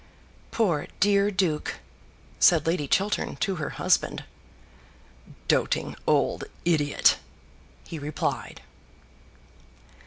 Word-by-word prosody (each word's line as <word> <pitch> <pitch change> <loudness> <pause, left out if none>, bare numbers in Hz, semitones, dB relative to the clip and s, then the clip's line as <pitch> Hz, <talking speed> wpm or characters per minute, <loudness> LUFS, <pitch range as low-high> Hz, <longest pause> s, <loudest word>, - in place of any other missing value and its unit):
"Poor 180 -10 0
dear 200 0 +4
duke," 185 -6 -1 0.6
said 160 -4 +5
Lady 165 -3 0
Chiltern 200 +8 0
to 195 -2 -1
her 155 - -3
husband. - - +1 1.2
"Doting - - +1
old - - +2 0.2
idiot!" 150 -4 +3 0.7
he 165 - -7
replied. 150 +1 -3
170 Hz, 85 wpm, -26 LUFS, 150-200 Hz, 1.2 s, said